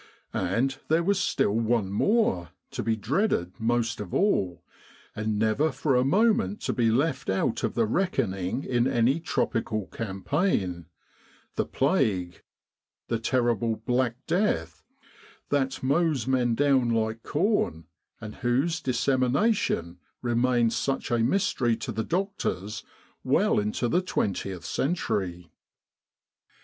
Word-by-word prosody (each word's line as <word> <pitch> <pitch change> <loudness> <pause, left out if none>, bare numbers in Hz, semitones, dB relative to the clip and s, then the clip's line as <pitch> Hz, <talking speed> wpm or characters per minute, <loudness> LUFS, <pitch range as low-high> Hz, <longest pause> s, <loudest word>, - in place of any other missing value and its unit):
And 120 +9 0
there 160 +2 +2
was 200 +2 +2
still 105 - +1
one 115 -3 +1
more, 105 - +1 0.2
to - - -3
be 115 -1 0
dreaded 110 - 0
most 115 0 0
of 100 - -6
all, 90 - +1 0.5
and 110 0 -1
never 110 +9 +2
for 140 -4 0
a 125 - +4
moment 155 - +2
to - - -1
be 115 -2 +2
left 135 +4 0
out 105 +4 0
of - - -1
the 115 - +3
reckoning 115 - -1
in 120 0 +1
any 125 +4 +2
tropical 110 - -1
campaign 95 - -2 0.7
the - - -1
Plague 110 - 0 0.7
the 115 - 0
terrible 115 -2 +1
Black 120 +2 0
Death, 165 - 0 0.7
that 135 -2 0
mows 145 -2 +1
men 125 -3 +1
down 135 -2 +3
like 110 0 0
corn, 150 - 0 0.3
and 110 -1 -8
whose 140 +8 0
dissemination 130 - +1 0.2
remained 120 -1 +2
such 135 -2 -2
a 120 - +2
mystery 120 - +1
to - - -5
the 110 +2 -2
doctors 165 - -2 0.4
well - - +3
into 105 +4 -1
the 175 +9 +2
twentieth 95 - -2
century. 100 - -2
120 Hz, 125 wpm, -27 LUFS, 105-140 Hz, 0.7 s, a